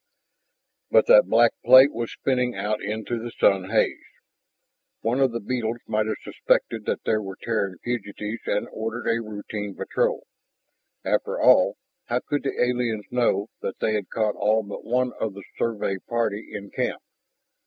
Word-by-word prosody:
But - - +5
that - - +7
black - - +5
plate 130 +3 +8
was 115 -1 -3
spinning 125 -2 0
out 105 +2 -2
into 110 +3 -3
the 120 +1 -5
sun 95 -4 +2
haze. - - +1 1.0
One 120 +4 0
of 135 -2 +3
the 115 - -3
beetles 115 0 -2
might 110 0 0
have 110 - -1
suspected - - 0
that - - -2
there 110 -1 +1
were 95 -2 -7
Terran 100 -5 -2
fugitives 110 -2 -4
and 105 - 0
ordered 115 +2 -4
a 115 0 +1
routine 105 -2 -6
patrol. - - -1 0.8
After - - 0
all, - - +5 0.3
how 120 +1 -1
could 145 -1 -2
the 135 - -3
aliens 120 -4 -1
know 120 -4 +1
that 95 - -4
they 110 - 0
had 105 -3 -2
caught 110 -2 0
all 110 +2 +2
but 100 0 -8
one 125 +1 0
of 105 -3 -2
the 100 - -9 0.2
Survey 105 -4 -1
party 115 -3 -1
in 100 -1 -7
camp? - - -2
110 Hz, 165 wpm, -24 LUFS, 105-120 Hz, 1.0 s, plate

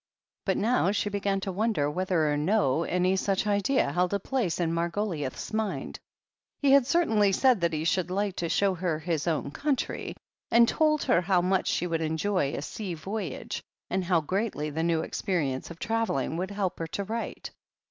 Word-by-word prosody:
But - - +1
now 225 -4 +2
she 205 0 0
began 200 -1 0
to 190 - -3
wonder 210 -6 +1
whether 165 -1 +1
or - - +1
no 155 -2 +2
any 180 +1 +1
such 195 +1 0
idea 210 +6 +2
held 180 +2 +1
a - - 0
place 220 -6 -1
in 165 -1 0
Margo 170 +5 0
liouth's 150 - -4
mind. 215 -2 -2 0.6
He 280 -2 +3
had 275 -3 +6
certainly 225 - +3
said 250 0 +3
that 170 -1 +2
he 155 -1 -2
should 180 +2 +1
like 195 +1 -1
to 170 - -2
show 200 +2 +2
her 175 -3 -1
his 160 0 -2
own 155 -3 -1
country, 280 - -2 0.3
and 235 0 +6
told 305 +1 +2
her 170 - +3
how 180 0 +2
much 185 +1 +1
she - - 0
would 165 -2 -1
enjoy 160 -1 0
a - - -4
sea 190 0 -5
voyage 190 -2 -5 0.3
and 190 0 0
how 175 -2 +2
greatly 185 -3 -2
the 160 +2 -2
new 165 -1 +1
experience 155 -8 -2
of 170 - -9
travelling 205 - -1
would 185 +3 -2
help 200 -2 -2
her 165 - -3
to 200 +5 -3
write. 225 +4 -5
185 Hz, 190 wpm, -28 LUFS, 165-210 Hz, 0.6 s, had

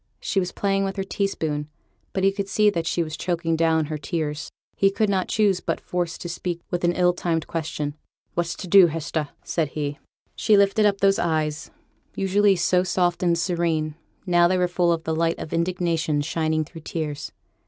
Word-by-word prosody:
She 195 - 0
was 180 -1 -2
playing 195 -1 0
with 195 -1 -2
her 195 - -2
teaspoon, 160 -7 -2 0.4
but 190 - -2
he 195 - +5
could 200 0 -4
see 210 +1 +4
that 165 -3 -2
she 170 - +1
was 155 -1 -5
choking 170 -2 -1
down 160 -1 +2
her 155 0 -4
tears; 150 0 -3 0.3
he 195 - +4
could 205 +1 0
not 190 -2 0
choose 205 -4 +2
but - - -2
force 175 -2 -2
her - - -13
to 175 - -5
speak 175 0 -4
with 175 0 -2
an 175 0 +3
ill 180 0 +3
timed 165 -3 -1
question. 150 -3 -3 0.4
'What's 175 0 -1
to 185 - -7
do, 190 0 +8
Hester?' 155 -1 -3
said 165 -3 0
he. 145 0 -4 0.4
She 215 -2 +4
lifted 200 +2 +4
up 200 -1 0
those 195 0 +4
eyes, 155 -2 -1 0.5
usually 195 +1 +3
so 180 +1 +2
soft 175 -1 0
and 170 -2 +2
serene; 165 -3 0 0.3
now 175 -2 +4
they 185 +1 +1
were 180 0 +2
full 175 -1 +1
of 165 -1 -1
the 160 - -1
light 165 +1 +1
of - - -7
indignation 165 -3 0
shining 155 0 0
through 165 +1 -11
tears. 150 -2 -4
175 Hz, 200 wpm, -24 LUFS, 160-190 Hz, 0.5 s, do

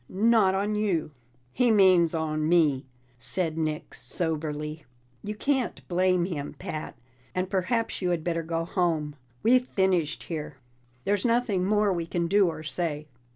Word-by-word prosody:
Not 210 -1 +3
on 205 +2 0
you." 195 -8 0 0.4
"He 245 - +2
means 185 -6 +5
on 155 -1 -1
me," 150 -6 +3 0.3
said 160 +5 -2
Nick 155 -1 -3
soberly. 150 +3 -3 0.4
"You 210 +1 -4
can't 265 +2 -1
blame 180 0 +2
him, 150 -6 -5
Pat. 155 - -6 0.4
And 185 +1 -1
perhaps 225 +5 0
you 180 - 0
had 170 -3 0
better 165 -1 -1
go 165 0 -2
home; 165 -5 0 0.3
we've 250 +2 +4
finished 185 -5 +1
here. 150 -4 -5 0.5
There's 200 -1 +1
nothing 230 -6 +1
more 205 0 +2
we 170 -2 -3
can 170 0 -1
do 200 +1 +4
or 155 -2 -4
say." 155 -1 -3
175 Hz, 150 wpm, -27 LUFS, 155-200 Hz, 0.5 s, means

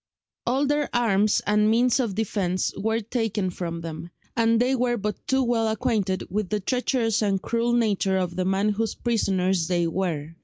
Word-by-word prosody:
All 265 +4 +2
their 295 +1 0
arms 215 -3 +2
and 210 +1 +3
means 245 +3 +3
of 230 -7 -1
defence 195 -4 -1
were 220 +2 -1
taken 215 -4 -2
from 170 -2 -5
them, 165 +1 -7 0.3
and 230 0 +3
they 255 +2 +2
were 245 -1 +1
but 210 -1 -4
too 265 0 +2
well 235 -2 +1
acquainted 210 -3 0
with 205 0 -2
the 210 - 0
treacherous 235 0 0
and 200 -2 +1
cruel 235 +4 0
nature 205 -5 +1
of 180 -2 -2
the 185 0 -1
man 195 +2 +1
whose 220 +2 -1
prisoners 190 -7 0
they 175 -2 +1
were. 165 -4 -2
210 Hz, 180 wpm, -25 LUFS, 190-235 Hz, 0.3 s, and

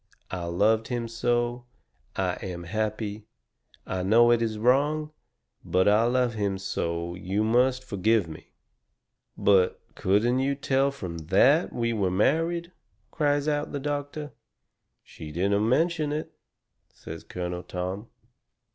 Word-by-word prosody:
I 90 -2 -3
LOVED 105 +6 +2
HIM 120 -2 -2
SO. 120 +1 -1 0.5
I 95 -2 0
AM 90 -2 -5
HAPPY. 110 +2 -3 0.6
I 95 - -3
KNOW 115 +5 +5
IT 120 -1 +3
IS 110 -2 -1
WRONG, 145 +6 +2 0.5
BUT 95 +1 +2
I 105 +3 +5
LOVE 125 0 +1
HIM 100 -3 -1
SO 85 -3 -3
YOU 95 +4 -2
MUST 125 +3 +2
FORGIVE 110 -3 +1
ME.'" 80 -1 -11 0.9
"But 95 -3 +3
couldn't 115 +7 +2
you 140 +1 +1
tell 135 0 +1
from 90 -12 -6
THAT 100 - +3
we 115 -1 -1
were 100 -4 +1
married?" 165 - +1 0.4
cries 145 -2 +1
out 150 0 -1
the 145 - -2
doctor. 145 +1 -4 0.7
"She 75 -1 -10
didn't 100 +6 +1
mention 160 +2 +1
it," 155 +1 -3 0.6
says - - -9
Colonel 90 -1 -5
Tom. 90 +5 -5
115 Hz, 130 wpm, -27 LUFS, 95-135 Hz, 0.9 s, KNOW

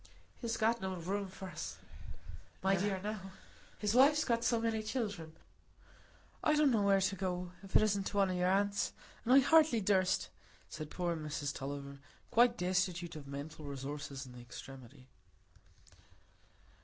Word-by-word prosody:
"He's 230 -2 -2
got 225 +1 +2
no 190 -1 -2
room 195 +3 -3
for 190 0 -8
us, 155 -4 -6 0.9
my 195 0 +4
dear, 195 0 0
now; 205 -3 -5 0.4
his 210 0 0
wife's 290 +5 +6
got 235 -1 +1
so 235 0 +2
many 225 -1 0
children. 205 -8 -3 1.1
I 305 - +4
don't 300 -2 +4
know 220 -3 +3
where 200 -1 +4
to 190 +1 +1
go, 180 -1 -3
if 195 -1 -11
it - - +7
isn't 200 -2 +1
to 205 - -3
one 195 -2 +3
o' - - -1
your 180 0 +1
aunts; 200 +1 +1 0.3
and 240 - 0
I 260 - +9
hardly 310 -3 +5
durst," 190 -2 +2 0.4
said 155 -1 -6
poor 175 0 -1
Mrs 150 -2 -3
Tulliver, 140 0 -6 0.3
quite 240 +1 +5
destitute 180 -2 0
of 145 -3 -9
mental 145 +3 -7
resources 140 0 -5
in 125 - -12
this 125 0 -11
extremity. 130 +1 -11
190 Hz, 160 wpm, -34 LUFS, 155-215 Hz, 1.1 s, I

